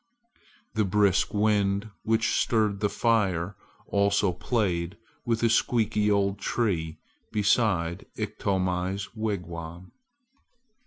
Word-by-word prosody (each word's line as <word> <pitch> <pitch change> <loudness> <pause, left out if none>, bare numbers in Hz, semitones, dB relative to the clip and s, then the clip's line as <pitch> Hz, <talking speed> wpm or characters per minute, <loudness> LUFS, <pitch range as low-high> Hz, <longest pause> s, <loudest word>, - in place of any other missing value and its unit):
The 110 - +2
brisk 100 -1 +2
wind 105 0 +1
which 110 0 +1
stirred 105 -3 +1
the 105 0 +1
fire 100 -6 +1 0.3
also 100 -1 +2
played 90 -2 -1 0.3
with 115 -1 0
a 115 - +4
squeaky 110 -3 +2
old 100 -1 +1
tree 85 -11 -1 0.3
beside 100 -5 +1
Iktomi's 95 -2 -1
wigwam. 90 -5 -5
100 Hz, 95 wpm, -27 LUFS, 90-110 Hz, 0.3 s, a